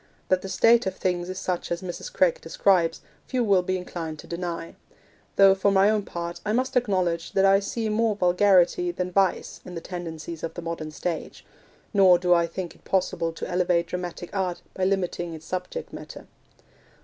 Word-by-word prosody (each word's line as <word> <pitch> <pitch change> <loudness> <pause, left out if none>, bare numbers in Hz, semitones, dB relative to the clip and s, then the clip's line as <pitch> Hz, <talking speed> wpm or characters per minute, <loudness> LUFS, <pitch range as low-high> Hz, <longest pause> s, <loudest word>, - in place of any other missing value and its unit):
That 185 -1 +3
the 195 - -6
state 230 +2 +4
of 190 - -2
things 180 -1 -1
is 185 - -5
such 180 -2 -3
as 170 +2 -2
Mrs. 185 - -6
Craik - - +2
describes, 175 - +2 0.3
few 255 -2 0
will 200 -4 +4
be 185 +1 -1
inclined 165 -3 -6
to - - -11
deny; 170 -1 -4 0.6
though, 195 -1 +7
for 195 +1 +2
my 195 +1 +5
own 215 -1 +1
part, 170 0 -5
I 210 - -1
must 260 +3 0
acknowledge 185 -8 0
that 195 0 +4
I 195 0 +6
see 220 +3 -3
more 215 0 +1
vulgarity 180 -1 +3
than 180 +1 -3
vice 195 0 0
in 180 - -9
the - - -3
tendencies 165 -2 -7
of 165 - -5
the 175 - -5
modern 165 -2 -4
stage; 165 +1 -5 0.5
nor 190 -3 +7
do 180 0 +3
I 170 -1 +3
think 175 +1 -5
it - - -24
possible 185 -3 0
to 165 - -6
elevate 175 -1 +1
dramatic 175 0 -6
art 185 -3 -2
by 185 - -1
limiting 180 -3 -1
its 160 0 -12
subject 185 - -5
matter. - - -9
180 Hz, 190 wpm, -25 LUFS, 170-195 Hz, 0.6 s, though